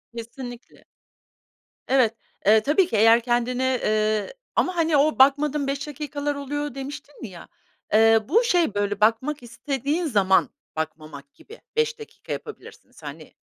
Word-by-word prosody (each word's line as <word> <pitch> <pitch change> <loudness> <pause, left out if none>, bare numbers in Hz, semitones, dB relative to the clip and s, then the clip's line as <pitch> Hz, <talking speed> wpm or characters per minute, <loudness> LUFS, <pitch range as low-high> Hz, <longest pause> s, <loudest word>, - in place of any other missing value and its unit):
Kesinlikle. 240 +1 -9 1.0
Evet, 255 -4 +3 0.3
eee, 215 +2 +6
tabii 325 - +3
ki - - -3
eğer 225 +2 +6
kendini, 245 +1 0
eee, 215 - 0 0.2
ama, 365 - +1
hani, 325 -3 +2
o 300 +1 +2
bakmadığım 285 +1 +3
5 280 +2 -3
dakikalar 290 0 -4
oluyor 290 0 -4
demiştin 280 0 -8
ya, 185 -6 -9 0.5
eee, 225 +1 +6
bu 455 +8 +4
şey, 350 - +2
böyle, 205 0 -2
bakmak 245 +6 +1
istediğin 280 +7 -3
zaman 200 -8 +3 0.3
bakmamak 155 -3 -6
gibi 450 - -15 0.2
5 460 0 0
dakika 445 - -11
yapabilirsiniz. 440 - -11
Hani, - - -9
265 Hz, 135 wpm, -24 LUFS, 220-295 Hz, 1.0 s, eee